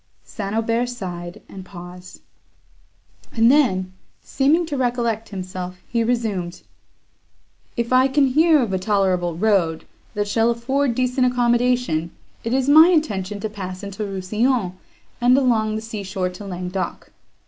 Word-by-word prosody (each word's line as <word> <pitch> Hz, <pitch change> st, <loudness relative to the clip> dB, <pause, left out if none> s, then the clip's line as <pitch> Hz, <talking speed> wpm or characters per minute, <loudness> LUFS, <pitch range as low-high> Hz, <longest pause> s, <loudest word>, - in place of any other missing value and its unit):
St. 205 Hz, -3 st, -5 dB
Aubert 230 Hz, +2 st, 0 dB
sighed, 180 Hz, -7 st, -7 dB
and 190 Hz, -1 st, -10 dB
paused; 180 Hz, 0 st, -11 dB, 1.1 s
and 230 Hz, +1 st, +4 dB
then, 185 Hz, -11 st, +2 dB, 0.3 s
seeming 300 Hz, +6 st, +2 dB
to 305 Hz, -3 st, -4 dB
recollect 240 Hz, -4 st, -1 dB
himself, 185 Hz, -2 st, -6 dB
he 235 Hz, -1 st, 0 dB
resumed: 220 Hz, -7 st, -2 dB, 1.1 s
"If 235 Hz, +1 st, -1 dB
I 255 Hz, +1 st, +5 dB
can 275 Hz, +1 st, +3 dB
hear 305 Hz, +2 st, +4 dB
of 210 Hz, -5 st, -3 dB
a 190 Hz, -, 0 dB
tolerable 185 Hz, -4 st, +1 dB
road, 180 Hz, -4 st, +1 dB, 0.3 s
that 205 Hz, 0 st, -1 dB
shall 225 Hz, +2 st, +2 dB
afford 250 Hz, +2 st, 0 dB
decent 250 Hz, +1 st, +1 dB
accommodation, 240 Hz, -8 st, +1 dB, 0.3 s
it 230 Hz, -, -3 dB
is 260 Hz, +1 st, +1 dB
my 310 Hz, +3 st, +8 dB
intention 210 Hz, -, 0 dB
to 220 Hz, -, -1 dB
pass 185 Hz, -3 st, -7 dB
into 200 Hz, +1 st, -7 dB
Rousillon, 205 Hz, +2 st, -1 dB, 0.5 s
and 250 Hz, +2 st, +5 dB
along 225 Hz, -5 st, +2 dB
the 220 Hz, -, -4 dB
sea 220 Hz, -2 st, -6 dB
shore 190 Hz, -1 st, -2 dB
to 180 Hz, +3 st, -10 dB
Languedoc. 180 Hz, 0 st, -5 dB
220 Hz, 140 wpm, -21 LUFS, 185-250 Hz, 1.1 s, my